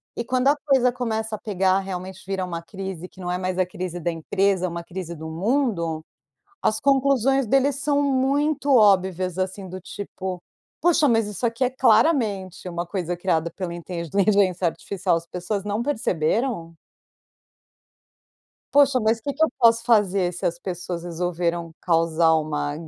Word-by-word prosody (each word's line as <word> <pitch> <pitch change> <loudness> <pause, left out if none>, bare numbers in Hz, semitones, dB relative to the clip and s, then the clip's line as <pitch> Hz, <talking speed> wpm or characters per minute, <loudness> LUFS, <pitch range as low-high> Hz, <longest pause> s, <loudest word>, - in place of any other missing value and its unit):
e 235 - -2
quando 255 +2 0
a 290 - +5
coisa 265 -4 +4
começa 220 -3 -2
a - - -10
pegar, 190 -2 +1
realmente 190 -1 -6
vira 190 -1 -2
uma 170 -2 -5
crise 190 -1 -7
que - - -19
não 175 -1 -5
é 180 - 0
mais 185 0 -3
a 185 - +3
crise 180 -2 -5
da 170 +1 -1
empresa, 190 +3 0
é - - -3
uma 170 0 -5
crise 175 -1 -6
do 160 0 -8
mundo, 180 - 0 0.6
as 215 0 +1
conclusões 270 -2 +3
deles 270 +3 +3
são 285 0 +1
muito 280 +1 +2
óbvias, 185 -4 +3
assim, 185 0 -3
do 185 +1 -7
tipo: 185 -1 -6 0.4
"Poxa, 325 -4 +4
mas 225 -3 +3
isso 210 +4 -4
aqui 230 +2 0
é 250 - +2
claramente 220 - +2
uma 175 0 -3
coisa 175 -1 -3
criada 170 -2 0
pela 175 -1 -5
inteligência 185 +2 +1
artificial, 180 +1 -1
as 165 - -7
pessoas 180 +3 -3
não 205 +2 -2
perceberam?" 210 - -1 2.0
Poxa, 280 -3 +5
mas 220 +1 +2
que 280 +4 -4
que 315 - +1
eu - - +4
posso 230 -1 +5
fazer 200 -6 +3
se 175 - -6
as 170 0 0
pessoas 175 -1 -5
resolveram 170 -1 -2
causar 165 -1 +3
uma 150 -2 -1
190 Hz, 165 wpm, -23 LUFS, 175-235 Hz, 2.0 s, a